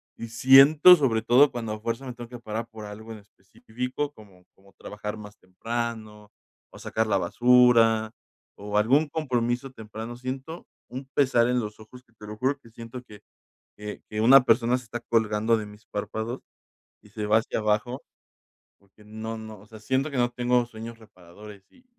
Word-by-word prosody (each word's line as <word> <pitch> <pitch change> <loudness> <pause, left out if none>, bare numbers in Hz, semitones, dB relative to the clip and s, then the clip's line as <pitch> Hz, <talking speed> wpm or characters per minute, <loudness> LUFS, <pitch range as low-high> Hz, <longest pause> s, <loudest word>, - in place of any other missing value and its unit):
y 115 - -7
siento, 135 +9 +7
sobre 120 -8 0
todo 125 +5 +5
cuando 115 -3 -5
a 110 - -7
fuerza 115 +4 -4
me 125 - -6
tengo 120 -1 -10
que 125 - -9
parar 115 0 -5
por 110 -2 -10
algo 110 +2 -10
en - - -10
específico, 120 +7 -6
como 100 -7 -18
como 100 0 -24
trabajar 105 +1 -7
más 105 -1 -12
temprano, 110 +1 -6 0.4
o - - -14
sacar 110 0 -2
la 105 - +2
basura, 115 +1 +4 0.4
o 105 +1 -4
algún 135 +9 +3
compromiso 125 -3 -2
temprano, 110 0 -8
siento 130 +6 -7 0.2
un 130 +2 -8
pesar 125 -4 +3
en 125 0 +1
los 105 -2 -6
ojos 125 +4 -14
que 120 - -33
te 105 -2 -13
lo 105 0 -8
juro, 135 +5 -1
que 115 - -18
siento 115 +2 -10
que 105 -3 -15 0.6
que 105 0 -8
que 105 0 -4
una 135 +4 +8
persona 120 +1 +3
se 125 - -13
está 115 +1 -6
colgando 110 -1 +1
de 105 - -6
mis 105 +1 -15
párpados 110 +4 -5 0.6
y 105 - -19
se 105 0 -5
va 105 +1 +4
hacia 115 - -4
abajo, 110 +4 -1 0.8
porque 100 +2 -24
no 110 +1 -7
no, 110 -1 -10
o 100 - -18
sea, 110 0 -14
siento 130 +6 -1
que - - -4
no 120 0 +2
tengo 125 0 +1
sueños 115 0 -10
reparadores 100 0 -15
y, 255 - -24
115 Hz, 185 wpm, -25 LUFS, 105-125 Hz, 0.8 s, una